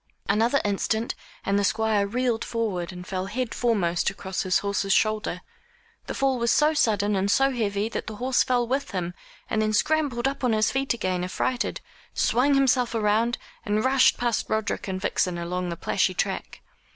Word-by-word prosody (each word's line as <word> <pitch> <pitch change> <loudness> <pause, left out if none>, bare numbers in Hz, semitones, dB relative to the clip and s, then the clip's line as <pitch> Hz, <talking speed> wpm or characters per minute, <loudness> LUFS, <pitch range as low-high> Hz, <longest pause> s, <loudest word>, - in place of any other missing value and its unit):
Another 225 +7 +3
instant, 220 +3 0 0.3
and 200 +1 +2
the - - +1
Squire 210 0 +1
reeled 240 +1 0
forward, 200 -7 -2
and 180 -1 -9
fell 185 0 -3
headforemost 220 -6 0
across 190 -1 -4
his 185 -1 +2
horse's 200 -1 0
shoulder. 215 +1 +1 0.7
The - - -4
fall 270 -2 +1
was 235 0 +1
so 300 +6 +4
sudden 210 -7 +2
and 195 +1 0
so 270 +6 +3
heavy, 210 -4 -1
that - - -5
the 215 - -5
horse 250 +3 +1
fell 245 -1 +2
with 275 +3 -1
him, 180 -2 -2 0.3
and 220 - 0
then 215 0 0
scrambled 275 -1 +1
up 275 0 -4
on 250 - +3
to 225 - +2
his 215 - +2
feet 270 -2 0
again 185 -5 -1
affrighted, 240 +7 -2 0.3
swung 275 +4 +3
himself 255 -3 +2
round, 225 +2 +2 0.3
and 215 0 0
rushed 260 0 +4
past 240 -2 -1
Roderick 220 -1 -1
and 190 -1 -3
Vixen 180 -1 0
along 180 +1 -3
the 170 - -4
plashy - - 0
track. - - -3
220 Hz, 180 wpm, -25 LUFS, 195-245 Hz, 0.7 s, so